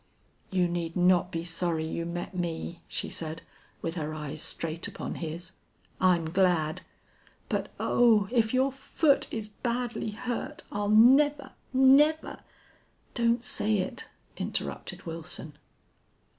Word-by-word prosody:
"You 180 -2 +2
need 170 -1 -3
not 180 0 +3
be 165 0 -3
sorry 165 -1 -1
you 165 +1 -3
met 175 +2 -5
me," 170 -1 -3
she - - -3
said, 160 0 -5 0.4
with 165 - -2
her 155 -1 -3
eyes 150 0 -5
straight 165 0 -2
upon - - -5
his. 170 +2 -6 0.5
"I'm 175 -4 +3
glad.... 170 -4 +2 0.7
But - - -1
oh! 220 -4 +4
if 225 -3 +2
your 260 +2 +2
foot 275 +2 +1
is 220 -2 -4
badly 240 +1 -2
hurt 240 +3 -4
I'll 205 0 -1
never 270 +6 +5 0.2
never 275 +4 +4 0.4
' - - -37
"Don't 235 0 +2
say 215 -3 +2
it," 235 +6 -3 0.3
interrupted - - -4
Wilson. 160 -2 -6
185 Hz, 130 wpm, -28 LUFS, 165-240 Hz, 0.7 s, never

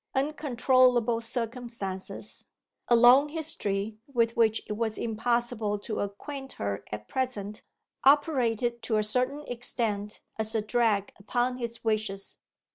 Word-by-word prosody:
Uncontrollable 255 -4 +3
circumstances 230 -5 -5 0.4
(a 240 - +5
long 250 +5 +7
history, 220 -10 -2
with 230 -2 +2
which 225 -1 +3
it - - -4
was 220 0 -2
impossible 230 -1 0
to 215 +2 -4
acquaint 270 +7 -5
her 100 0 -3
at 105 0 -6
present) 215 -6 -3 0.4
operated 245 -5 +3
to 220 - 0
a 215 - +2
certain 255 +7 0
extent 220 -4 -2 0.2
as 220 +1 -2
a 220 - +2
drag 215 -3 +1
upon 245 +5 0
his 235 -1 -5
wishes. 215 -3 -1
230 Hz, 120 wpm, -28 LUFS, 210-250 Hz, 0.4 s, long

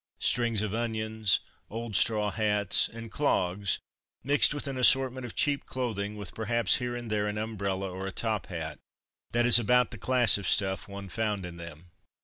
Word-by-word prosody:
Strings 115 -3 +1
of 105 -2 -3
onions, 110 -2 0 0.3
old 115 -1 -5
straw 105 +1 +2
hats, 105 -2 +1
and 115 -1 -10
clogs, 100 -8 0 0.5
mixed 140 +3 +5
with 145 -1 -2
an 135 - -4
assortment 130 0 +3
of - - -11
cheap 145 -1 0
clothing, 105 -5 -3
with 100 -3 -6
perhaps 115 -1 +1
here 125 -1 -4
and 120 -2 -6
there 105 -1 0
an 105 0 -3
umbrella 100 -3 -3
or 95 +1 -5
a - - -4
top 110 +1 -2
hat. 80 -6 -5 0.5
That 120 0 +2
is 120 0 +9
about 125 +2 +3
the - - -8
class 125 -4 +3
of 100 - -5
stuff 95 -3 +1
one 100 0 -8
found 105 -1 -2
in 85 -1 -9
them. 85 0 -11
110 Hz, 180 wpm, -28 LUFS, 100-120 Hz, 0.5 s, is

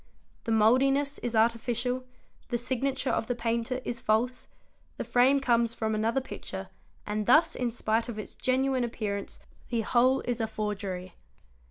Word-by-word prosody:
The 230 - -1
mouldiness 270 +6 +3
is 240 -1 -3
artificial, 240 +3 +1 0.4
the 240 - 0
signature 260 +2 -1
of 225 - -1
the 245 - -1
painter 235 +2 -1
is 235 - -3
false, 235 +4 0 0.5
the - - -2
frame 260 +3 +4
comes 235 -3 +2
from 220 -1 -1
another 225 +4 +1
picture 260 - -7 0.4
and 210 0 -2
thus 305 +7 +5
in 250 -1 -1
spite 225 0 0
of 225 - -5
its 215 - -6
genuine 260 0 +1
appearance 210 -4 -4 0.3
the 235 -2 0
whole 255 +4 +3
is 245 -1 -2
a 225 - 0
forgery. 195 -4 -4
235 Hz, 155 wpm, -28 LUFS, 220-255 Hz, 0.5 s, thus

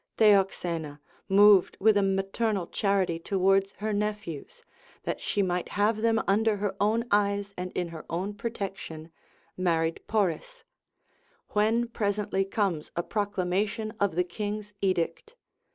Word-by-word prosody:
Theoxena, 175 -7 +2 0.3
moved 200 -1 +6
with 215 +1 +5
a 205 - +4
maternal 195 +1 0
charity 190 -3 0
towards 195 +2 +2
her 215 +1 -3
nephews, 205 -7 -4 0.4
that - - -3
she 205 - 0
might 180 -1 -1
have 210 +2 +3
them 225 0 +2
under 215 +2 +2
her 200 -1 -2
own 220 +3 +2
eyes 200 0 +1
and 180 0 -5
in 175 -1 -2
her 165 -1 -8
own 185 +5 -2
protection, 195 -7 -6 0.4
married 165 -3 0
Poris: 215 - -1 0.9
when 225 +3 +2
presently 205 -3 -1
comes 195 -5 -1
a 170 - -1
proclamation 205 +2 -1
of 200 -5 +1
the 180 - +3
king's 210 +3 -5
edict. 185 - -1
200 Hz, 130 wpm, -28 LUFS, 180-210 Hz, 0.9 s, moved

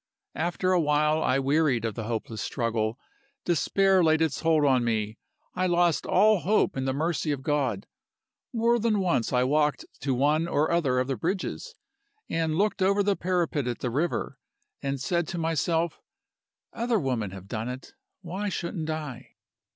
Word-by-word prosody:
After 175 +2 -1
a 180 - +4
while 150 +1 +2
I 130 - +2
wearied 135 -3 +2
of 110 - -2
the 110 +1 -5
hopeless 115 -1 -4
struggle. 115 -1 -1 0.5
Despair 190 +2 +3
laid 160 -1 +4
its 160 -4 0
hold 160 -3 +3
on 130 -3 +3
me 110 -2 -1 0.3
I 185 0 0
lost 175 -2 +2
all 215 -1 +4
hope 200 +7 +1
in 130 -1 -2
the 135 - +1
mercy 155 +1 -1
of 135 -2 -3
God. 135 -9 0 0.7
More 235 +1 +2
than 220 -2 +1
once 170 -11 +1
I 125 0 +3
walked 150 +2 +1
to 135 -2 -1
one 150 +5 +2
or 155 -2 +1
other 150 -7 +2
of 125 - +2
the 135 -2 -2
bridges, 190 - -3 0.5
and 160 -1 -1
looked 205 0 +1
over 200 +2 +3
the 200 0 +2
parapet 175 -8 -1
at 120 - -2
the 125 - -2
river, 155 +7 -2 0.4
and 140 0 -2
said 170 +5 0
to 175 - -4
myself 165 +1 0 0.7
'Other 235 0 0
women 125 - -1
have 95 0 -10
done 110 +3 -4
it: 125 +1 -8 0.3
why 190 +4 -3
shouldn't 170 -3 -4
I? 150 -6 -6
155 Hz, 170 wpm, -27 LUFS, 130-175 Hz, 0.7 s, a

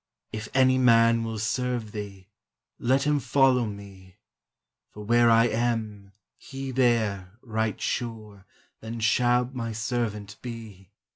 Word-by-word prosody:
Again: 110 - -4
"If 110 - -9
any 130 -1 +4
man 115 -2 +4
will 115 -1 -4
serve 120 0 -2
Thee, 100 -3 -8 0.5
let 130 +3 +2
him 145 0 +2
follow 130 -2 +3
me; 100 -2 -11 0.7
For 105 - -10
where 120 +1 +4
I 115 0 +5
am, 110 -4 -2 0.3
he 135 -1 -7
there, 110 -7 +1
right 110 -3 -2
sure, 110 -5 -5 0.3
Then 115 +1 -7
shall 120 +2 +2
my 115 -3 -4
servant 110 -3 -3
be." 110 -6 -9
115 Hz, 130 wpm, -26 LUFS, 105-125 Hz, 0.7 s, I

